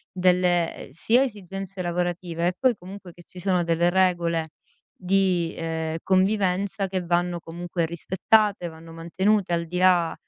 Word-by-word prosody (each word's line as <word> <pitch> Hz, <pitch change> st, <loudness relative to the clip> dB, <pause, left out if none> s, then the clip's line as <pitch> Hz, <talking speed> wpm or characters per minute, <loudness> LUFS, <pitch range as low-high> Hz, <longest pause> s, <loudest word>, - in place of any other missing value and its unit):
delle, 180 Hz, -2 st, +2 dB
uhm, -, -, -18 dB
sia 230 Hz, -, +2 dB
esigenze 195 Hz, -5 st, -6 dB
lavorative 175 Hz, -1 st, -2 dB
e 180 Hz, -, +1 dB
poi 255 Hz, -2 st, +3 dB
comunque 185 Hz, -1 st, -11 dB
che 175 Hz, -, -16 dB
ci 180 Hz, -, -12 dB
sono 180 Hz, -1 st, +1 dB
delle 170 Hz, +1 st, +2 dB
regole 175 Hz, -3 st, +1 dB, 0.4 s
di, 185 Hz, -3 st, 0 dB
uhm, 160 Hz, -1 st, -3 dB
convivenza 195 Hz, 0 st, +1 dB
che 185 Hz, -1 st, -2 dB
vanno 175 Hz, 0 st, 0 dB
comunque 170 Hz, +1 st, -4 dB
rispettate, 190 Hz, +3 st, +1 dB
vanno 165 Hz, 0 st, -12 dB
mantenute 180 Hz, +4 st, 0 dB
al 170 Hz, 0 st, 0 dB
di 180 Hz, +2 st, -4 dB
là 180 Hz, -2 st, +4 dB
180 Hz, 145 wpm, -24 LUFS, 170-190 Hz, 0.4 s, là